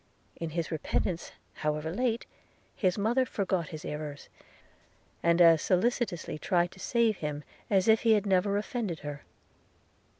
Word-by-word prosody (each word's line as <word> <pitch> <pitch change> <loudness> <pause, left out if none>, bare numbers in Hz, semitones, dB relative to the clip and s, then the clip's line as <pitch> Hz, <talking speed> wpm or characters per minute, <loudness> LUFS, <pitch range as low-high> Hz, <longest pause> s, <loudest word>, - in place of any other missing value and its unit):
In 165 - -4
his 165 +1 -3
repentance, 165 +2 -2 0.2
however 150 +1 -2
late, 235 +2 0 0.5
his 185 -2 +1
mother 230 +6 +2
forgot 190 -8 -1
his 155 -2 -8
errors, 150 -1 -6 0.9
and 170 0 +3
as 165 -2 +7
solicitously 185 -5 0
tried 175 +2 +1
to 190 - -15
save 230 0 +2
him 150 -1 -4 0.3
as 190 -1 +3
if 220 0 +5
he 225 -1 +5
had 210 -1 +2
never 200 +1 +2
offended 210 - -3
her. 145 -1 -6
180 Hz, 140 wpm, -29 LUFS, 160-215 Hz, 0.9 s, as